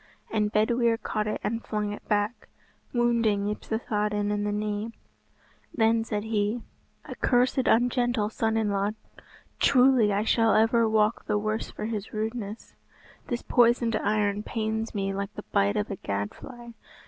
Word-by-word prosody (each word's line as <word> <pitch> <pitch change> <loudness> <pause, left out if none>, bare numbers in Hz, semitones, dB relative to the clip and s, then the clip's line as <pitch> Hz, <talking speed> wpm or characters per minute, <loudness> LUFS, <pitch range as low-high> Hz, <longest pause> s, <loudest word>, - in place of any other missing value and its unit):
And 210 -1 0
Bedwyr 230 +2 +2
caught 215 -1 -3
it 215 - -2
and 230 +1 -2
flung 210 -1 -2
it - - -8
back, 210 +2 -1 0.4
wounding 230 -4 +2
Yspathaden 210 -1 -1
in 205 0 -1
the 210 - 0
knee. 210 +2 -3 0.8
Then 225 0 +3
said 210 -2 -3
he, 220 +1 -1 0.4
"A - - -7
cursed 250 +1 +2
ungentle 240 -2 +2
son 225 0 0
in 215 -2 +1
law, 200 +1 0 0.7
truly 255 -5 +5
I 200 +1 +1
shall 225 0 +3
ever 225 +1 +4
walk 215 0 +1
the 210 - +1
worse 215 +1 -2
for 210 - -6
his 215 -2 -4
rudeness. 220 0 -4 0.5
This 240 -1 -3
poisoned 235 -1 +3
iron 210 -1 0
pains 220 0 -3
me 195 -1 -1
like 200 +1 -4
the 210 - -8
bite 200 +1 +2
of 210 0 -2
a 195 - -4
gad 100 -4 -3
fly. 240 -2 -11
215 Hz, 155 wpm, -27 LUFS, 210-230 Hz, 0.8 s, truly